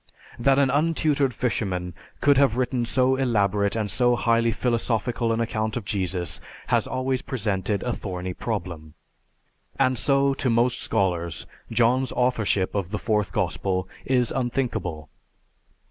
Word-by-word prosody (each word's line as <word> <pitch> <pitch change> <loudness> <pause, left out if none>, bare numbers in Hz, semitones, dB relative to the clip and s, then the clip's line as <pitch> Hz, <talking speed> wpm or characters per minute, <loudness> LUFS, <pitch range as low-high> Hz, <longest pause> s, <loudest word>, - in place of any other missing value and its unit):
That 135 +3 +4
an 140 -2 +3
untutored 150 -2 +2
fisherman 95 -8 -2 0.3
could 145 0 +5
have 135 -5 +3
written 125 -1 0
so 130 +2 +2
elaborate 105 -5 +1
and 105 -3 -1
so 120 +7 +3
highly 115 -1 +2
philosophical 115 0 0
an 115 - 0
account 110 -1 -1
of 115 - -5
Jesus 90 -3 -2 0.3
has - - +2
always 130 0 -1
presented 105 -7 -2
a 125 - -1
thorny 90 -3 -5
problem. 85 -8 -5 0.8
And 130 -3 +2
so 140 0 +3
to 135 -1 -1
most 120 +1 +2
scholars 85 -4 -1 0.3
John's 120 +3 +2
authorship 110 -6 +1
of 100 -4 -2
the 105 - -2
Fourth 105 -2 0
Gospel 95 -1 -1 0.2
is 125 -3 +2
unthinkable." 120 - -2
115 Hz, 135 wpm, -25 LUFS, 100-130 Hz, 0.8 s, could